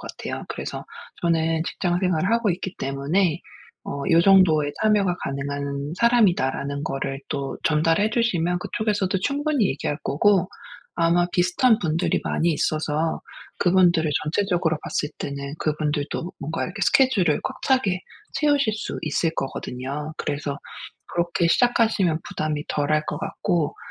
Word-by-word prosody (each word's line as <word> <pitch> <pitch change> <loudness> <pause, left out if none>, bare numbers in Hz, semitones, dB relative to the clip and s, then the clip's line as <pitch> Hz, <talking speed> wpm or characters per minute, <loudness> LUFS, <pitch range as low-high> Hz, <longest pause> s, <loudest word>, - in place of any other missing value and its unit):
같아요. - - -6
그래서 - - -5 0.4
'저는 165 -1 +1
직장 175 -1 -1
생활을 180 0 +1
하고 230 -3 +2
있기 185 +2 -4
때문에 150 +6 0 0.4
어 140 0 -4
요 165 - +7
정도의 170 -7 +5
참여가 200 -4 +3
가능한 140 +2 -3
사람이다.'라는 170 - +2
거를 135 -2 -3
또 140 -1 -3
전달해 165 +7 +2
주시면 180 -7 +1
그쪽에서도 205 -3 -1
충분히 285 -3 +1
얘기할 145 +2 -2
거고 190 +6 +3 0.5
아마 170 +1 +3
비슷한 185 +7 +3
분들이 165 +1 0
많이 170 - +1
있어서 155 +1 -1 0.4
그분들을 175 -4 +4
전체적으로 175 -1 0
봤을 150 - -2
때는 140 0 -5
그분들도 155 +2 -2
뭔가 160 +3 -2
이렇게 195 +2 -6
스케줄을 200 - +3
꽉 - - -5
차게 230 -9 +2 0.3
채우실 290 -7 +2
수 - - -5
있을 160 +2 0
거거든요. 135 +3 -4
그래서 145 0 -3 0.5
그렇게 170 0 0
시작하시면 220 -6 +3
부담이 150 -1 -2
덜할 150 +1 +1
것 - - -3
같고 175 -5 -1
170 Hz, 325 characters per minute, -24 LUFS, 150-195 Hz, 0.5 s, 요